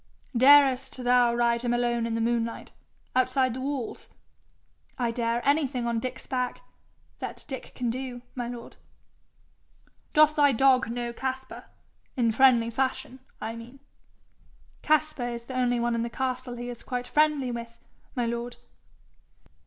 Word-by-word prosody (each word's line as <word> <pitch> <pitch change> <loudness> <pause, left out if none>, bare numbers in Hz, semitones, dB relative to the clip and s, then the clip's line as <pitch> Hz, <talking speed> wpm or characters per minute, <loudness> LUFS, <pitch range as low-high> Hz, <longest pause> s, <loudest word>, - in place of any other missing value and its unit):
'Darest 265 0 +5
thou 245 -1 +4
ride 235 0 +2
him 240 0 0
alone 240 -1 0
in 225 - -2
the 230 - -1
moonlight 230 0 -1 0.4
outside 255 0 +2
the 260 - -5
walls.' 270 -3 -4 0.9
'I 240 -2 0
dare 235 +1 -1
anything 280 -4 +1
on 235 -1 0
Dick's 255 +2 -5
back 250 -2 -2 0.6
that - - -6
Dick 265 - -6
can 245 -2 -1
do, 250 -1 -6
my 245 -2 -4
lord.' 240 -1 -8 1.4
'Doth 305 0 +6
thy 290 -2 +5
dog 260 0 +4
know 240 0 -3
Caspar 265 +1 -5 0.5
in 235 -2 +3
friendly 235 -1 +4
fashion, 260 +1 -2 0.2
I 225 +1 -4
mean?' 240 +4 -11 1.0
'Caspar 305 -5 +1
is 235 0 -9
the 260 - -7
only 245 -1 +1
one 240 0 0
in 230 - 0
the 235 - -2
castle 255 0 -3
he 245 0 -6
is 240 -1 -7
quite 250 -1 -4
friendly 295 -3 +2
with, 235 0 -7 0.4
my 245 -2 0
lord.' 235 +1 -3
245 Hz, 145 wpm, -27 LUFS, 235-260 Hz, 1.4 s, Doth